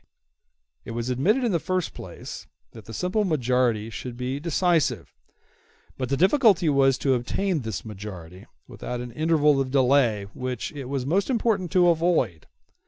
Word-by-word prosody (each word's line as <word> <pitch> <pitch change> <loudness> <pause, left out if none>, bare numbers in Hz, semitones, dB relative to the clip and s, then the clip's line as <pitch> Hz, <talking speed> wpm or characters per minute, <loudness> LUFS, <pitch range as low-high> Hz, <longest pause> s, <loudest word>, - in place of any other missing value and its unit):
It - - -8
was 120 +2 -2
admitted 195 - +2
in 235 - +1
the 170 - +1
first 185 +1 -2
place - - -9 0.2
that 110 -2 -13
the - - -10
simple 180 - 0
majority 125 - +1
should 120 +2 -7
be 130 +2 -3
decisive; 160 - 0 0.8
but 130 -2 -4
the 135 - 0
difficulty 195 - +4
was 135 -2 +3
to 135 -1 +1
obtain 165 +9 -1
this 110 -4 -5
majority 95 -4 -9 0.2
without 125 - -6
an 120 0 -6
interval 150 -1 +2
of 130 - -2
delay 130 -5 +3
which 125 -2 -4
it 140 -3 -7
was 130 0 -3
most 190 - +1
important 220 -7 0
to 180 -1 +5
avoid. 165 - +1
135 Hz, 160 wpm, -25 LUFS, 120-175 Hz, 0.8 s, to